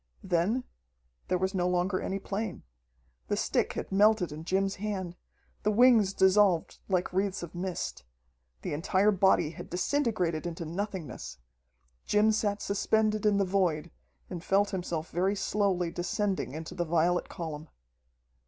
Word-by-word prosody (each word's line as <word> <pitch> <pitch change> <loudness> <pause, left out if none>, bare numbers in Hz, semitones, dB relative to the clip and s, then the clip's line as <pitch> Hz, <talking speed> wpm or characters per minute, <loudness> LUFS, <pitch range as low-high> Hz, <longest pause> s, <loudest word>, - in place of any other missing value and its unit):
Then 190 +7 +1 0.6
there 180 - +1
was 190 +2 -1
no 180 -2 +1
longer 180 +1 0
any 195 - -2
plane. 200 0 -4 0.6
The - - 0
stick - - 0
had - - -5
melted 205 -3 +4
in 155 +2 -8
Jim's 195 +2 0
hand, 190 -4 -4 0.5
the 210 - +1
wings 220 -2 +5
dissolved 190 -3 +3
like 180 -1 0
wreaths 190 -1 0
of 170 - -8
mist. 175 - -4 0.6
The - - -3
entire 190 +6 +2
body 190 -5 +3
had 165 - -10
disintegrated 180 - 0
into 170 0 -5
nothingness. 180 - -5 0.7
Jim 210 +1 +4
sat 210 -1 0
suspended 215 +1 +1
in 205 -1 +3
the 200 - +2
void, 180 -5 0 0.4
and 175 -1 -7
felt 200 +2 +2
himself 175 -4 -3
very 190 +4 +1
slowly 190 -4 0
descending 185 -3 -2
into 160 0 -6
the 175 - -1
violet 170 +2 +1
column. 155 -2 -6
190 Hz, 145 wpm, -29 LUFS, 175-205 Hz, 0.7 s, wings